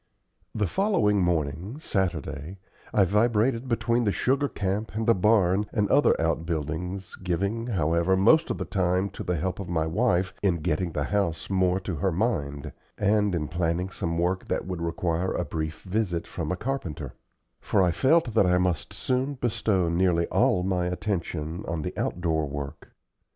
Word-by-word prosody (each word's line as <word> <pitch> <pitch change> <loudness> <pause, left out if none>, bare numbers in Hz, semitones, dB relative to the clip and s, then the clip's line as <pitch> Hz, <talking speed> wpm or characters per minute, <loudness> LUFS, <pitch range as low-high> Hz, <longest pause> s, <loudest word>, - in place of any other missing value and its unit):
The 105 -2 +1
following 170 - +2
morning 85 - -1
Saturday 90 - -2 0.3
I 100 - +4
vibrated 115 +5 +2
between 115 0 +1
the 105 - +2
sugar 135 +6 +1
camp 100 +2 -3
and 110 0 -1
the 115 - +5
barn 100 -1 +3
and 105 -4 +1
other 145 - +4
out 80 0 0
buildings, 85 +4 -4
giving, 100 +6 -1
however, 85 -2 +2
most 155 - +5
of - - -1
the - - -3
time 95 0 0
to - - -7
the 90 - -1
help 90 +5 -2
of 95 -3 -6
my 80 -3 0
wife 90 +1 +1
in 90 -5 +1
getting 80 +3 -1
the 75 - -1
house 95 -2 -1
more 95 -1 +2
to 95 -4 -4
her 95 +4 +1
mind, 80 - -1 0.3
and 105 -2 +2
in 75 -3 -1
planning 85 +3 -1
some 85 -3 -3
work 90 +2 0
that - - -1
would 90 -2 -4
require 85 +1 -1
a 90 - -1
brief 80 -1 -4
visit 95 -3 -1
from 80 -3 -4
a 90 - -1
carpenter; 110 - -4 0.5
for 100 - +2
I 90 - +3
felt 135 - +3
that 105 -4 +4
I 90 0 +4
must 90 -4 -1
soon 130 +3 -1
bestow 105 -7 0
nearly 85 0 +2
all 90 - +2
my 90 -1 0
attention 90 -4 -3
on 80 -2 -2
the - - -4
outdoor 80 -3 -1
work. 70 0 -7
90 Hz, 170 wpm, -26 LUFS, 85-105 Hz, 0.5 s, the